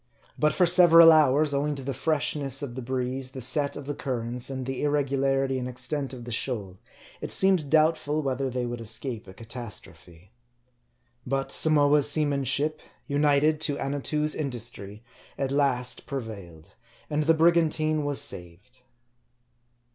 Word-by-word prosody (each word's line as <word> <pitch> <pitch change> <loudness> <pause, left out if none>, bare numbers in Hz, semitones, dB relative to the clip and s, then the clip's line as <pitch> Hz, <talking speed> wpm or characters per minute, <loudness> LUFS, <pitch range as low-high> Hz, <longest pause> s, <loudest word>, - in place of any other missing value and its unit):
But 150 0 +2
for 180 - +3
several 170 -2 +7
hours, 150 -1 +4
owing 145 +1 0
to 135 - -7
the 135 +1 -3
freshness 140 -1 -1
of 130 -4 -5
the 130 - -6
breeze, 130 +1 -3
the 130 - -7
set 140 +3 -1
of 145 - -8
the 145 - -3
currents, 125 -2 -3
and 130 -1 -5
the 135 0 -4
irregularity 135 -2 0
and 125 - -4
ex 125 0 -6
MARDT. 125 - -7
101 145 -3 -2
tent 130 - -6
of 120 - -10
the 120 - -7
shoal, 105 -6 -3 0.4
it - - -5
seemed 185 -7 +2
doubtful 155 -1 +2
whether 135 0 -1
they 125 0 -3
would 120 -1 -5
escape 115 0 -5
a 95 - -11
catastrophe. 105 -6 -9 0.9
But 135 +2 -2
Samoa's 145 -2 +3
seamanship, 145 0 0 0.2
united 145 +1 +2
to 145 -3 +1
Annatoo's 145 +2 -1
industry, 120 -6 -6 0.3
at 135 -1 -2
last 135 -3 0
prevailed; 100 - -8 0.3
and 150 0 -1
the 165 +1 +4
brigantine 155 -2 +2
was 145 -1 -2
saved. 95 +9 -8
135 Hz, 155 wpm, -26 LUFS, 125-150 Hz, 0.9 s, several